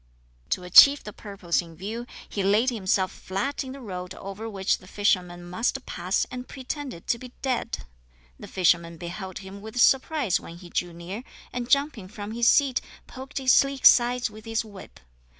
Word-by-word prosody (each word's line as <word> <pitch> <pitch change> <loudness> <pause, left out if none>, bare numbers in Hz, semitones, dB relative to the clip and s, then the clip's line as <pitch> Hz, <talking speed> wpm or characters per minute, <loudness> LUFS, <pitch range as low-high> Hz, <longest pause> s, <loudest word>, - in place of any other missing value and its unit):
To 180 - -1
achieve 280 +11 +8
the 210 - -8
purpose 195 -5 -2
in 165 -1 -13
view, 220 +7 -6 0.2
he 200 - -3
laid 210 +6 +3
himself 190 -4 0
flat 205 +11 -3
in 260 - -7
the 275 - -9
road 180 -6 -6
over 195 +3 -7
which 195 -2 0
the 185 - -16
fisherman 180 -3 0
must 230 +8 -1
pass 185 +2 -1
and 250 0 -6
pretended 265 - -6
to 235 - 0
be 250 0 -11
dead. 255 - -2 0.5
The - - -9
fisherman 170 -2 +2
beheld 180 +2 -6
him 195 +1 -9
with 220 +3 -6
surprise 270 - +3
when 170 - -10
he 175 -1 -13
drew 175 -1 -1
near, 175 +7 -7 0.3
and 245 0 -4
jumping 280 -8 +1
from 205 0 -7
his 235 +1 +1
seat 275 -2 +4 0.2
poked 265 +2 -9
his 260 -2 +4
sleek 275 -1 +3
sides 245 0 +6
with 215 0 -13
his 225 0 -1
whip. 200 -3 -12
210 Hz, 180 wpm, -26 LUFS, 185-250 Hz, 0.5 s, achieve